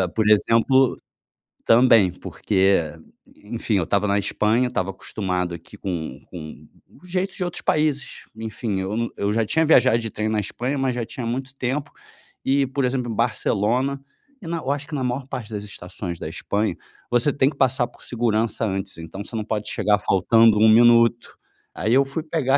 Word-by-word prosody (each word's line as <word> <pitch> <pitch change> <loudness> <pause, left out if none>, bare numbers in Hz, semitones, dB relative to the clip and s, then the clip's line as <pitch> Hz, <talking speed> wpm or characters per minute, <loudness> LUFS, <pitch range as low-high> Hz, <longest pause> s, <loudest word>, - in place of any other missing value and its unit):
Por 110 -1 +2
exemplo 115 +5 +4 0.7
Também. 115 -5 +6
Porque, 95 +1 +1 0.6
enfim, 115 +1 -3
eu 95 - +1
estava 100 +5 0
na 100 0 +2
Espanha, 110 +5 +1
estava 95 -6 -2
acostumado 90 -2 -3
aqui - - -13
com 80 -8 -5
com 80 -4 -10 0.2
o - - -20
jeitos 185 +2 -2
de - - -1
outros 175 -1 -3
países, 150 -3 0
enfim, 110 -2 -4
eu 95 +3 -3
no 115 0 -2
eu 100 +1 0
já 115 0 +1
tinha 160 +9 +2
viajado 130 -7 +5
de 115 -1 -4
trem 110 0 -3
na 110 -1 0
Espanha, 125 +7 -3
mas 135 -2 0
já 120 -2 -2
tinha 120 +2 -6
muito 130 +3 -4
tempo 135 +3 -3 0.5
e, 135 +1 +3
por 135 +1 -1
exemplo, 125 -2 -1
em - - -4
Barcelona 120 +4 0 0.4
e 175 - -9
na 170 +1 -2
Eu 140 -4 -2
acho 145 +1 -3
que 155 - -5
na 135 - -2
maior 125 +2 -2
parte 115 -5 -6
das 105 -1 -4
estações 90 -3 -7
da - - -5
Espanha, 105 -3 -2 0.4
você 120 +4 +3
tem 135 -1 +3
que - - -11
passar 130 -2 +2
por - - -20
segurança 115 -2 0
antes. 95 -4 -4
Então 80 +4 -8
você 115 - -9
não 110 - -2
pode 105 -1 -3
chegar 105 -1 +2
faltando 105 +3 +4
1 110 +1 +6
minuto. 115 +1 +4 0.4
Aí 110 - 0
eu 135 +1 +4
fui 140 +4 -4
pegar 150 -4 +1
115 Hz, 190 wpm, -22 LUFS, 105-130 Hz, 0.7 s, Também